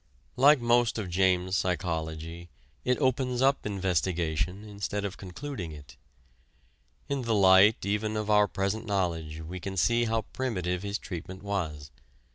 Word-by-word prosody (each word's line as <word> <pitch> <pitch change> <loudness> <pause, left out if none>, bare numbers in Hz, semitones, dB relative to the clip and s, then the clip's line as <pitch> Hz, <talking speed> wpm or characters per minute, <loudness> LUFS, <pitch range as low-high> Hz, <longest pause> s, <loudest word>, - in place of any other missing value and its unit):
Like 140 +3 +6
most 120 -1 +2
of 100 -5 -4
James's 95 0 +2
psychology, 85 -1 -3 0.3
it 125 0 +1
opens 130 -2 0
up 135 -4 +2
investigation 90 -1 -1
instead 105 -1 -4
of 100 - -4
concluding 95 - -6
it. 70 -3 -12 1.1
In 140 -1 -1
the 115 -2 0
light 95 +2 +6
even 105 +2 -1
of 105 -1 -2
our 105 -1 +5
present 100 +4 -2
knowledge 85 -6 -2
we 85 +3 -7
can 95 +2 -6
see 120 +5 +3
how 115 -1 0
primitive 90 -9 -2
his 100 +1 -2
treatment 95 0 -8
was. 80 -8 -3
95 Hz, 140 wpm, -28 LUFS, 90-110 Hz, 1.1 s, Like